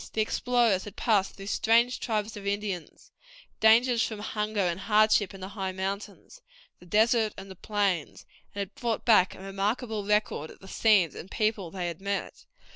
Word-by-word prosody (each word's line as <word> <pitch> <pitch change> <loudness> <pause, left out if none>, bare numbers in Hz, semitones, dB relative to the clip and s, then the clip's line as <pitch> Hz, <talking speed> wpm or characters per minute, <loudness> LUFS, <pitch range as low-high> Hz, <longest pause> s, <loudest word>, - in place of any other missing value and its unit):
The 220 - +1
explorers 230 -3 +1
had 205 - -9
passed 205 -4 +1
through 195 - -10
strange 230 +4 +2
tribes 215 -2 -2
of 200 -1 -7
Indians, 200 -4 -4 0.5
dangers 230 +2 +5
from 220 - -2
hunger 210 0 -2
and 175 -1 0
hardship 210 -1 +3
in 195 - -11
the 190 - -6
high 195 -2 -4
mountains, 200 - -6 0.4
the 180 - -16
desert, 220 +2 +2
and 195 0 -9
the - - -9
plains, 195 -5 -2 0.3
and 200 - -2
had 200 +1 -6
brought 235 -2 -3
back 210 -5 +4
a - - -14
remarkable 205 +3 -2
record 210 -7 0
of - - -13
the 195 - -15
scenes 195 -6 +3
and 180 - -9
people 215 -5 -1
they 180 +1 -4
had 170 0 -5
met. 200 0 -4
205 Hz, 180 wpm, -28 LUFS, 190-220 Hz, 0.5 s, dangers